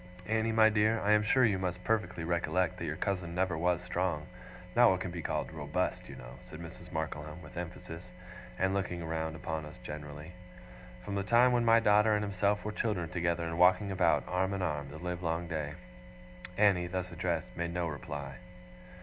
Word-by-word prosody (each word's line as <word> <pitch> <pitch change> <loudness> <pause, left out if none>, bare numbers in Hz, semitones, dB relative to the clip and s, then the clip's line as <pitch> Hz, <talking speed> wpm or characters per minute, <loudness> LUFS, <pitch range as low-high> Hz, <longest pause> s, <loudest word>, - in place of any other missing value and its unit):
Annie, 110 +2 +1
my 110 0 +6
dear, 110 +1 +2
I 105 - +1
am 105 0 +6
sure 125 +4 +4
you 100 -4 +2
must 90 -1 -3
perfectly 90 -7 0
recollect 85 +1 0
that - - -3
your - - -2
cousin 90 -4 -2
never 90 -2 +1
was 90 +2 +1
strong 90 -4 -1 0.5
not 120 0 +7
what 95 - +2
can 90 -1 -4
be 85 -1 -5
called - - -2
ROBUST, - - -2
you - - -8
know,' - - -11
said 80 - -9
Mrs. 85 +1 -10
Markleham, 80 0 -4
with - - -12
emphasis, 90 0 -7 0.5
and 95 +1 +1
looking 90 -4 -2
round 80 0 -2
upon 80 0 -4
us 75 0 -10
generally, 75 +1 -7 0.4
' - - -17
from 100 - -4
the 100 - 0
time 120 +5 +5
when 120 -1 +2
my 115 0 +7
daughter 105 0 +4
and 105 - 0
himself 100 +1 0
were 105 - -1
children 105 -6 -1
together, 85 -1 0
and 85 +1 -3
walking 90 +3 +5
about, 95 - +3
arm 95 +2 0
in 95 - -2
arm, 75 -5 -2
the 70 - -8
livelong 85 0 -2
day.' 75 -3 -3 0.8
Annie, 95 -4 +4
thus 90 0 -3
addressed, 85 -1 -2
made 85 0 -2
no 85 0 -1
reply. 75 -2 -6
90 Hz, 195 wpm, -32 LUFS, 80-100 Hz, 0.8 s, not